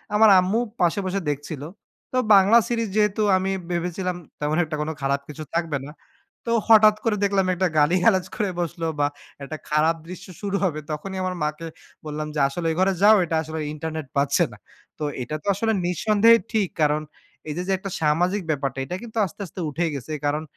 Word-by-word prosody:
আমার 220 +1 +7
আম্মু 190 +5 +1 0.2
পাশে 175 +3 +2
বসে 190 +1 -1
দেখছিল। 145 0 -6 0.5
তো - - +2 0.2
বাংলা 200 +4 +6
সিরিজ 230 -2 -1
যেহেতু 210 0 +2 0.2
আমি 190 +1 -1 0.2
ভেবেছিলাম 180 +1 -2 0.2
তেমন 150 +1 0
একটা 155 -1 -4
কোন 150 - -2
খারাপ 140 +1 0
কিছু 155 +1 -7
থাকবে 165 -3 0
না। 145 - -9 0.5
তো 230 - -1 0.2
হঠাৎ 215 -1 +7
করে 225 -3 +1
দেখলাম 200 -1 +2
একটা 185 +1 +1
গালিগালাজ 180 +5 +3
করে 210 -3 -1
বসলো 170 -1 -3
বা 145 - +3 0.4
একটা 155 +3 -6
খারাপ 155 +2 +3
দৃশ্য 185 +1 -9
শুরু 200 -1 -1
হবে। 160 -5 0
তখনই 190 +6 -5
আমার 185 0 -2
মাকে 155 +2 -3 0.4
বললাম 150 0 -4
যে - - -1
আসলে 165 +5 -3
ঐ - - 0
ঘরে 190 +1 +3
যাও 215 +1 +8
এটা 165 - -2
আসলে 160 0 -6
ইন্টারনেট 155 -1 -5
পাচ্ছে 140 0 +3
না। - - -12 0.4
তো - - -3 0.2
এটা 150 +5 -5
তো - - -12
আসলে 225 +3 0
নিঃসন্দেহে 215 +6 +4
ঠিক 210 -5 +1
কারণ 150 0 +2 0.5
এই - - -2
যে, - - -1
যে - - 0
একটা 195 +1 -6
সামাজিক 175 +6 +2
ব্যাপারটা 135 -3 -1
এটা 175 - -4
কিন্তু 230 -1 -9
আস্তে, 185 - -11
আস্তে 180 - -11
উঠে 165 +4 -1
গেছে। 140 +2 -6
কারণ 150 +2 0
175 Hz, 195 wpm, -23 LUFS, 150-200 Hz, 0.5 s, যাও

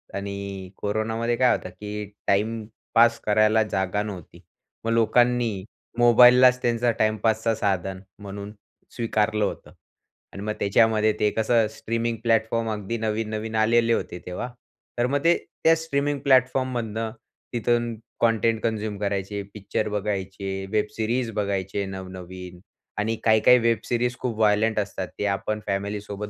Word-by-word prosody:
आणि 100 -1 -5
कोरोनामध्ये 110 +3 -1
काय 125 -1 +4
होतं - - -7
की 105 0 -6 0.2
टाईमपास 110 +2 +1
करायला 110 +1 +4
जागा 95 +2 0
नव्हती. 95 -6 -9 0.4
मग 115 - 0
लोकांनी 115 -3 +2 0.3
मोबाईललाच 125 +1 +7
त्यांचा 120 0 +1
टाईमपासचा 110 +1 +1
साधन 95 -3 -1 0.2
म्हणून 100 0 -7 0.4
स्वीकारलं 110 -2 +1
होतं. - - -6 0.6
आणि 100 - -7
मग 105 0 -2
त्याच्यामध्ये 110 +1 +3
ते 105 - +3
कसं 110 0 +2
स्ट्रीमिंग 115 0 -2
प्लॅटफॉर्म 115 0 +1
अगदी 105 +2 -3
नवीन-नवीन 110 0 -3
आलेले 115 +1 +3
होते 90 - -3
तेव्हा, 90 +8 -5 0.5
तर 120 +1 +2
मग 140 +2 -1
ते 170 +1 +5 0.3
त्या 165 0 +6
स्ट्रीमिंग 145 -2 -1
प्लॅटफॉर्म 130 -1 +3
मधून 115 -1 -3 0.4
तिथून 120 0 0 0.3
कंटेंट 115 -1 +2
कन्झ्युम 110 -2 -2
करायचे, 100 0 -2
पिक्चर 105 +1 -3
बघायचे, 95 -1 -3
वेब 105 -1 +2
सीरीज 115 +2 -1
बघायचे 100 -1 -2
नवनवीन. 95 -1 -8 0.4
आणि 110 +2 0
काही-काही 110 +2 +6
वेब 115 -1 +2
सीरीज 120 0 0
खूप 120 -4 -3
वायलेंट 110 +1 +3
असतात 100 -2 -3
ते - - 0
आपण 105 +2 -1
फॅमिली 100 +1 -2
सोबत 105 0 -6
110 Hz, 130 wpm, -24 LUFS, 100-115 Hz, 0.6 s, मोबाईललाच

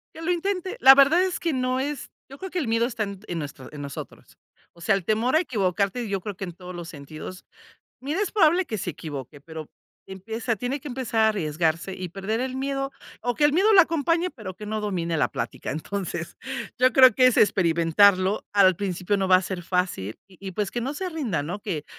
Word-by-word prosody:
Que 325 - -9
lo 335 - 0
intente, 370 +1 -2
la 270 +1 +9
verdad 280 +6 +6
es 370 -2 -1
que 335 -3 -1
no 255 0 0
es 285 0 -4 0.2
yo 275 - -11
creo 380 +2 -7
que 360 - -1
el 280 - -2
miedo 230 +1 +2
está 230 -3 -2
en 200 -2 -6
en 170 - -3
nuestro 140 -3 -8
en 150 - -8
nosotros. 140 -1 -9 0.4
O 170 - -18
sea, 195 +4 +3
el 190 - -3
temor 225 - +1
a - - +6
equivocarte, 205 - -1
yo 195 -2 -2
creo 205 -1 -5
que 195 - -7
en 175 -2 -5
todos 180 +1 -10
los 175 -1 -7
sentidos, 155 +5 -9 0.6
mira, 300 +9 -2
es 415 - -1
probable 370 -2 +4
que 220 -9 -4
se 180 - -3
equivoque, 145 -3 -8
pero 160 +1 -8 0.4
que 190 - -9
empiece, 225 +4 -3
tiene 250 +6 -3
que 295 - -8
empezar 245 -3 -2
a 220 - +5
arriesgarse 165 -2 -1
y 185 -1 -5
perder 200 +5 -3
el 260 0 -3
miedo 275 0 -2 0.3
o 245 +1 -1
que 295 - +2
el 295 - +5
miedo 395 +7 +4
lo 390 - +9
acompañe, 335 +1 +1
pero 210 - -8
que 210 - -8
no 215 +1 -2
domine 175 -5 -2
la 150 - +2
plática, - - -5
entonces, 170 +1 -4 0.4
yo 255 +1 +4
creo 255 -4 +7
que 255 - +5
es 255 - +4
experimentarlo. 185 +2 +4
Al 195 -3 +5
principio 190 +1 -1
no 190 -1 0
va 185 - +8
a 185 - 0
ser 185 -1 -5
fácil 180 - -2
y 185 -3 -19
y 195 -1 -6
pues 205 +2 -2
que 240 - -3
no 265 +5 -3
se 370 +4 -3
rinda, 255 - -2
¿no? 175 +8 -5
Que 170 -8 -4
210 Hz, 230 wpm, -25 LUFS, 180-265 Hz, 0.6 s, la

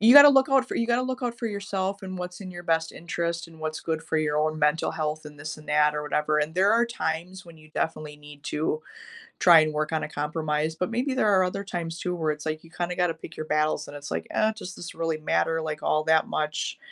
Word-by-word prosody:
You 225 +3 +7
gotta 285 0 +12
look 270 -2 +5
out 270 -1 +4
for - - -3
you 230 - +1
gotta 240 +1 +2
look 255 +1 -3
out 240 -1 -2
for 235 - -2
yourself 200 -1 -3
and 185 -1 -6
what's 180 +1 -6
in 190 -2 -7
your 175 0 -8
best 165 -1 +1
interest 170 0 -3
and 165 -1 -15
what's 155 0 -3
good 160 -1 -2
for 160 - -1
your 150 -1 0
own 155 0 +1
mental 150 +1 +2
health 155 0 -3
and 150 -1 -11
this 155 +1 -5
and 155 - -15
that 150 0 +4
or 150 - -2
whatever, 150 +1 +1
and 150 +1 -1
there 195 +3 +4
are 235 +1 +4
times 180 -3 -3
when 170 -1 -14
you 155 0 -17
definitely 155 -2 -2
need 145 -1 -14
to 155 +1 -1 0.6
try 170 -3 +8
and 155 0 +1
work 155 +1 -1
on 160 - 0
a - - -5
compromise, 155 +1 -1
but 180 +4 -2
maybe 255 +4 0
there 255 -5 +2
are 190 -2 +5
other 195 +2 -3
times 170 -3 -4
too, 180 +1 -2
where 160 -2 0
it's 150 +1 -9
like 155 0 -2
you 165 - -15
kinda 175 +1 -3
gotta 180 -2 +1
pick 160 0 -11
your 155 - -5
battles, 155 0 0
and 145 - -8
it's 145 -1 -8
like, - - -2
"Uh, 215 0 +3
does 185 -4 -7
this 175 - -8
really 165 -1 -1
matter, 160 +1 +1
like, 155 -1 -4
all 155 0 +1
that 160 0 +3
much?" 150 0 -2
165 Hz, 265 wpm, -26 LUFS, 155-185 Hz, 0.6 s, gotta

